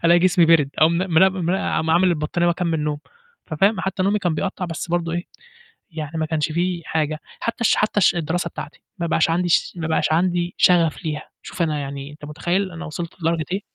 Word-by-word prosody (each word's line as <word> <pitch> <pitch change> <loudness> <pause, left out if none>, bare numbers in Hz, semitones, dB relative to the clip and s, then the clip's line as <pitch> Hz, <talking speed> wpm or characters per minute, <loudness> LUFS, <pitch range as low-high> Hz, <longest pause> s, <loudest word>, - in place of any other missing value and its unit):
ألاقي 170 +1 +6
جسمي 180 -1 +4
بِرِد، 155 -4 +4
أقوم 160 +2 +5
م 180 -3 +1
نم 185 -2 +3
عا 185 -3 0
عامل 180 +2 +4
البطانية 170 +1 0
وأكمّل 170 -2 0
نوم. 150 -1 -2 0.5
ففاهم، 190 +5 +2
حتى 190 0 -2
نومي 200 +2 +2
كان 175 -5 -1
بيقطّع، 185 +2 -3
بس 165 0 -5
برضه 170 -1 -1
إيه، 175 +1 -2 0.7
يعني 155 0 -5
ما 155 - 0
كانش 155 -1 -1
في 175 +1 -1
حاجة، 155 0 -1 0.2
حتى 230 - -3
الش 230 - +3
حتى 210 0 +1
الش 185 - +4
الدراسة 170 +1 -1
بتاعتي، - - -9 0.2
ما 170 - -1
بقاش 165 0 +2
عندي 175 +1 +1
ش - - +2
ما 165 - -3
يبقاش 160 0 +1
عندي 175 +1 +1
شغف 170 -1 +3
ليها، 150 -1 -3 0.2
شوف 175 - -4
أنا 155 -2 0
يعني 140 0 -6
أنت 150 0 -12
متخيّل، 175 +6 -2
أنا 170 +1 -7
وصِلت 170 +3 -7
لدرجة 165 -1 0
إيه؟ 195 - 0
170 Hz, 210 wpm, -22 LUFS, 155-180 Hz, 0.7 s, ألاقي